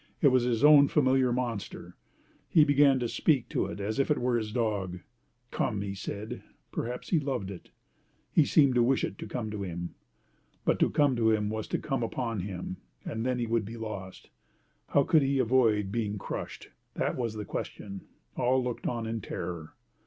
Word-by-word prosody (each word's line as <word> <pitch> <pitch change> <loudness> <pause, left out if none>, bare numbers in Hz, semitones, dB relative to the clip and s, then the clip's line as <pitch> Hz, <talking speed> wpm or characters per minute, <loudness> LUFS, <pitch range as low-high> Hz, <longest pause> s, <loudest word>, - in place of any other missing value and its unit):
It 145 - +6
was 130 -1 +4
his 120 0 0
own 145 -1 +8
familiar 130 -3 +3
monster. 120 -4 -4 0.5
He 155 - +6
began 145 -2 +5
to 120 - 0
speak 135 +1 +1
to - - 0
it - - -7
as 110 +5 -2
if 135 - +2
it 150 - +3
were 125 0 +1
his 110 -2 -1
dog. 100 -6 -1 0.5
"Come!" 100 -1 -1
he 100 -1 -4
said. 100 +2 -6 0.3
Perhaps 125 +2 -4
he 170 - +3
loved 135 -9 -3
it. 95 - -10 0.6
He 160 - +5
seemed 140 -2 +4
to 125 - +4
wish 130 +3 +2
it - - -3
to - - -6
come 110 -4 -4
to 105 -1 -4
him. 85 -2 -5 0.7
But - - +2
to - - +4
come 145 -3 +3
to 110 -1 +3
him 105 -1 +1
was 110 -1 -3
to - - -1
come 135 -4 -2
upon 115 -1 -2
him. 90 -1 -5 0.3
And 110 0 -3
then 125 0 0
he 120 - -1
would 115 -1 +1
be 115 +3 -7
lost. 100 -4 -7 0.6
How 140 - +3
could 160 +1 +4
he 135 0 +1
avoid 115 -5 +3
being 105 -2 -1
crushed! 95 - -6 0.2
That - - 0
was 115 -3 -2
the 105 -1 -5
question. 100 -1 -6 0.3
All 130 +1 +2
looked 125 -1 -3
on 115 -2 -2
in 110 0 -3
terror. 85 -4 -6
115 Hz, 195 wpm, -29 LUFS, 105-130 Hz, 0.7 s, own